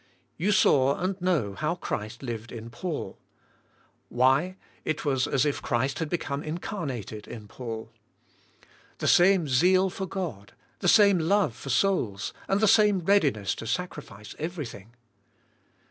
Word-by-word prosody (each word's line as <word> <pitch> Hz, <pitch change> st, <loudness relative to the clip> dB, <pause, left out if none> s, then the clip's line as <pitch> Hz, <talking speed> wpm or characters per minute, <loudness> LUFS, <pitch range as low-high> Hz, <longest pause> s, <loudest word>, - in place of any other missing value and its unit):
You 190 Hz, +6 st, 0 dB
saw 140 Hz, -8 st, +4 dB
and 185 Hz, +1 st, -2 dB
know 160 Hz, -, +1 dB
how 155 Hz, -, -1 dB
Christ 115 Hz, -, -5 dB
lived 115 Hz, -2 st, -5 dB
in 115 Hz, 0 st, -8 dB
Paul. 155 Hz, +7 st, -5 dB, 0.9 s
Why, 135 Hz, +9 st, +2 dB, 0.3 s
it 155 Hz, 0 st, -3 dB
was 135 Hz, -3 st, +1 dB
as 135 Hz, -1 st, +1 dB
if 145 Hz, -, -1 dB
Christ 130 Hz, +3 st, -1 dB
had 160 Hz, -2 st, -2 dB
become 145 Hz, -4 st, -2 dB
incarnated 150 Hz, -, -5 dB
in 110 Hz, -3 st, -9 dB
Paul. 115 Hz, -1 st, -7 dB, 1.1 s
The -, -, -2 dB
same 180 Hz, -2 st, +5 dB
zeal 185 Hz, +8 st, +3 dB
for 190 Hz, 0 st, -5 dB
God, 165 Hz, -, -5 dB, 0.3 s
same 200 Hz, -4 st, +6 dB
love 180 Hz, -, +2 dB
for 135 Hz, -, -9 dB
souls, 120 Hz, -, 0 dB
and 205 Hz, +3 st, +2 dB
same 210 Hz, -3 st, +5 dB
readiness 150 Hz, -, +2 dB
to 115 Hz, -, -7 dB
sacrifice 120 Hz, -, -5 dB
everything. 140 Hz, -, -6 dB
145 Hz, 130 wpm, -27 LUFS, 120-185 Hz, 1.1 s, same